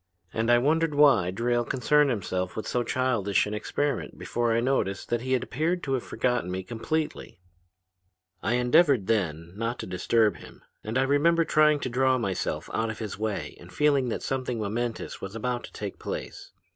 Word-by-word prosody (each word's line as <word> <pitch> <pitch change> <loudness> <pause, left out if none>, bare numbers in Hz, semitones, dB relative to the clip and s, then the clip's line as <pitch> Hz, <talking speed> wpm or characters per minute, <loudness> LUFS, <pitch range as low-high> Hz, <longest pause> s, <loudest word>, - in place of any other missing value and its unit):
And 115 +1 0
I 120 - +6
wondered 155 +4 +2
why 135 -12 +5
Drayle 120 +5 0
concerned 145 +4 +2
himself 95 -6 -2
with 110 - -4
so 125 - 0
childish 120 -6 +1
an 105 - -5
experiment 145 +7 -2
before 120 -1 -1
I 115 - +3
noticed 115 -6 -1
that 120 -1 0
he 130 +1 +1
appeared 160 +8 -1
to 135 - -1
have 130 - 0
forgotten 120 -8 -1
me 95 +1 -3
completely. 150 - -3 1.0
"I 120 - 0
endeavored 125 - +4
then 85 -6 -1
not 115 +3 -2
to - - -6
disturb 105 +4 +1
him, - - -14 0.2
and 110 +3 -2
I 130 - +3
remember 165 +5 +3
trying 150 -1 +4
to 130 - -2
draw 130 +1 +2
myself 100 -6 -2
out 115 0 0
of 110 - -5
his 105 -3 -6
way 105 -9 -3
and 90 +1 -13
feeling 140 0 +2
that - - -3
something 130 -3 -2
momentous 115 +3 -3
was 100 +2 -6
about 120 +2 -2
to - - -13
take - - -6
place. - - -6
120 Hz, 185 wpm, -27 LUFS, 105-135 Hz, 1.0 s, I